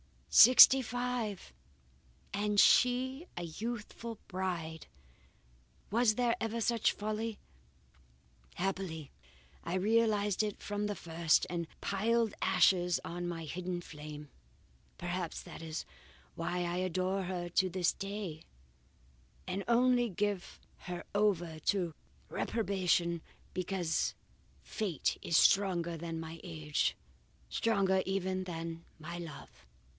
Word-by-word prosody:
Sixty 255 +2 +10
five! 245 -4 -3 0.8
and 205 +1 0
she 260 - +4
a 175 - -4
youthful 225 +5 -5
bride! 175 -4 -3 1.0
Was 225 0 +3
there 240 -1 +1
ever 225 +1 -2
such 235 0 +2
folly! 215 +1 -3 1.2
Happily 180 -5 -3 0.5
I 170 - -2
realized 210 0 +2
it 210 -2 -2
from 205 0 -2
the 205 - -2
first, 165 -2 +2
and 170 -2 -3
piled 225 +2 +1
ashes 180 -2 +4
on 175 +1 -4
my 165 -2 -4
hidden 175 +3 -4
flame. 150 -2 -9 0.7
Perhaps 175 -1 -4
that - - -10
is 160 -1 -5 0.5
why 180 - -2
I 175 0 -2
adore 185 +1 0
her 180 -1 -3
to 185 +2 +2
this 180 -1 +1
day 195 -5 -5 1.0
and 195 +1 -3
only 245 0 +4
give 200 0 -2 0.3
her 175 -1 -4
over 180 -6 +1
to 175 0 0 0.4
reprobation 180 -6 0 0.3
because 180 -3 -1 0.5
Fate 195 - -2
is 165 - +2
stronger 175 -4 +3
than 165 0 -5
my 165 0 -7
age 75 -2 -1 0.5
stronger 195 -4 +2
even 190 -1 -1
than 165 -1 -6
my 170 +2 -7
love. 165 - -10
185 Hz, 110 wpm, -33 LUFS, 170-210 Hz, 1.2 s, Sixty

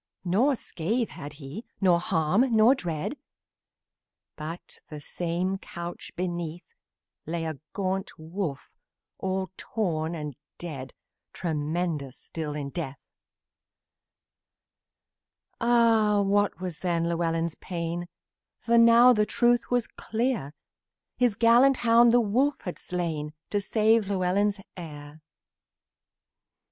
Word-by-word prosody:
Nor 235 +11 +3
scratch 225 +3 -2
had 150 -3 -8
he, 145 - -8 0.2
nor 180 -3 +4
harm, 195 +6 +2
nor 220 +4 +7
dread, 175 - -3 1.2
But, 160 +3 -8
the 150 - -7
same 180 +5 -2
couch 170 -2 -7
beneath, 175 -2 -3 0.6
Lay 165 0 -2
a 155 -4 -4
great 190 -1 -2
wolf, 160 -2 -5 0.5
all 190 0 -2
torn 170 -6 -2
and 150 -4 -5 0.2
dead 140 -7 -7 0.4
Tremendous 155 -3 -2
still 155 -3 -5
in 140 -2 -4
death. 140 -5 -4 2.6
Ah! 225 -3 +4
What 205 0 +2
was 180 -4 -5
then 170 -2 0
Llewellyn's 165 -1 0
pain! 170 0 -3 0.5
For 235 0 +4
now 235 +2 +8
the 210 -2 +2
truth 240 0 +2
was 245 -2 +2
clear: 225 - -2 0.6
The 250 -1 +5
gallant 245 +3 +6
hound 230 +1 +6
the 245 - +6
wolf 250 +7 +1
had 180 - -6
slain 160 -4 -3 0.2
To 205 - +2
save 220 +1 +3
Llewellyn's 200 +1 +1 0.2
heir. 150 -3 -9
180 Hz, 110 wpm, -27 LUFS, 160-220 Hz, 2.6 s, now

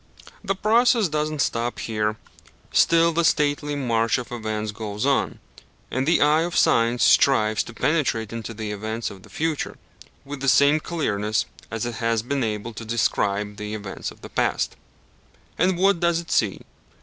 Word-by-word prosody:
The 195 -1 -1
process 225 +1 +3
does 150 0 -1
not 155 -2 -2
stop 120 0 -1
here: 110 -1 -2 0.5
still 165 0 +4
the 170 +1 +1
stately 145 -1 +1
march 115 -4 +1
of 125 -1 -7
events 110 -2 -3
goes 105 +1 -4
on; 140 -1 +1 0.5
and 130 +2 -1
the 165 - +3
eye 150 +2 +4
of 170 +1 -2
Science 115 +1 +3
strives 110 -6 +4
to 120 - -10
penetrate 130 -9 0
into 115 0 -6
the 105 -1 -4
events 110 +3 -4
of 95 -2 -12
the - - -17
future 160 -2 -2 0.5
with 145 0 -7
the 135 0 +1
same 140 +5 +5
clearness 110 - -1 0.2
as 115 +1 -3
it 120 -2 -4
has 115 -1 +1
been 140 +2 -1
able 110 +1 -3
to 110 - -8
descry 105 -2 0
the 105 +1 -7
events 105 -2 -6
of - - -15
the - - -10
past. - - 0 0.8
And 180 +1 +2
what 195 -1 +3
does 170 -1 +2
it 170 - -8
see? 105 -4 +1
120 Hz, 175 wpm, -23 LUFS, 110-155 Hz, 0.8 s, same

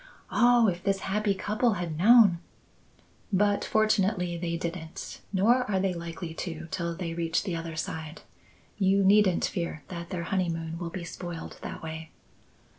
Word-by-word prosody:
Oh, 240 -1 +5
if 175 -2 -1
this 195 -1 0
happy 205 0 0
couple 215 +4 +1
had 175 -4 -3
known 200 0 +6 0.5
" - - -33 0.2
"But 205 +1 +2
fortunately 200 -4 +1
they 170 0 -2
didn't. 165 -1 -6
Nor 220 +6 +4
are 190 -2 +1
they 190 -1 +1
likely 170 0 -6
to, 165 -1 -5
till 170 -3 -2
they 170 -2 -4
reach 165 -1 0
the 185 -4 -2
other 165 -1 -5
side. 160 0 -5 0.6
You 195 0 +3
needn't 195 -2 +4
fear 170 -4 -3
that 170 -1 -6
their 180 -3 -3
honeymoon 165 -3 -2
will 175 -2 -4
be 175 +1 -6
spoiled 170 0 -7
that - - -7
way." 160 0 -6
180 Hz, 160 wpm, -28 LUFS, 165-200 Hz, 0.6 s, known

